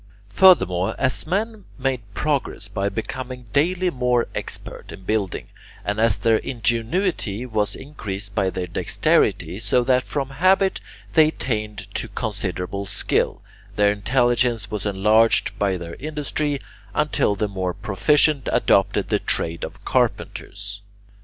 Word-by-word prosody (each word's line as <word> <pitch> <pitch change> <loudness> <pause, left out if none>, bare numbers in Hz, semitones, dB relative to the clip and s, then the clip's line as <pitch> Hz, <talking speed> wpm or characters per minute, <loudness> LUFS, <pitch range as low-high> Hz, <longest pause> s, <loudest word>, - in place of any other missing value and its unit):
Furthermore, 95 - +5
as 130 +3 0
men 210 +3 -2
made 130 -2 -1
progress 140 -8 -1
by 100 -1 -1
becoming 125 +4 -5
daily 180 +5 +2
more 125 -3 +1
expert - - -6
in 95 - -10
building, 100 -2 -2 0.4
and 105 +1 -1
as 115 -3 +3
their 115 -1 +3
ingenuity 115 - -1
was 105 -3 -1
increased 105 -8 -6
by 95 -3 +1
their 90 -1 -3
dexterity 90 +1 +1
so 125 +2 +2
that 130 0 +3
from 140 0 -3
habit 190 +6 +3 0.3
they 160 -2 +6
attained 105 -8 -3
to - - -1
considerable 100 -3 -4
skill, - - -1 0.3
their 105 0 +4
intelligence 120 0 +1
was 105 -1 -2
enlarged 105 +3 +4
by 100 -2 +1
their 85 -1 -7
industry 150 0 -2 0.4
until 150 -8 +2
the 105 +1 -1
more 95 -3 -3
proficient 130 - +2
adopted - - +2
the - - +2
trade 85 0 -1
of - - -8
carpenters. 100 0 -2
115 Hz, 130 wpm, -22 LUFS, 100-135 Hz, 0.4 s, they